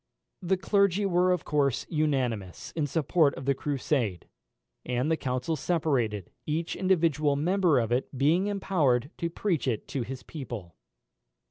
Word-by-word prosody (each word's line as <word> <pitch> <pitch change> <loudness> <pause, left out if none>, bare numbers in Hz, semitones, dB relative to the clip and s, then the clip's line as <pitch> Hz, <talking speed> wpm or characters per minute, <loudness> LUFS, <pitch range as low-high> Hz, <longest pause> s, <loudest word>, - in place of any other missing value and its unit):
The 190 +1 +1
clergy 200 +1 +2
were 180 -1 +3
of 180 -3 0
course 140 -4 +1
unanimous 130 - -1
in 155 -3 0
support 155 0 +2
of 130 - -7
the 140 - +3
Crusade; 135 - -1 0.6
and 125 +5 -1
the - - +4
council 130 +2 -2
separated, 135 - -1 0.2
each 160 +2 -1
individual 165 -6 +2
member 175 +1 +2
of 115 -2 0
it 125 +2 +1
being 160 +9 +3
empowered 155 -10 +1
to 170 - -1
preach 170 -4 -1
it 115 -5 -1
to 135 - -2
his 125 +2 -6
people. 120 - -7
150 Hz, 145 wpm, -28 LUFS, 125-175 Hz, 0.6 s, the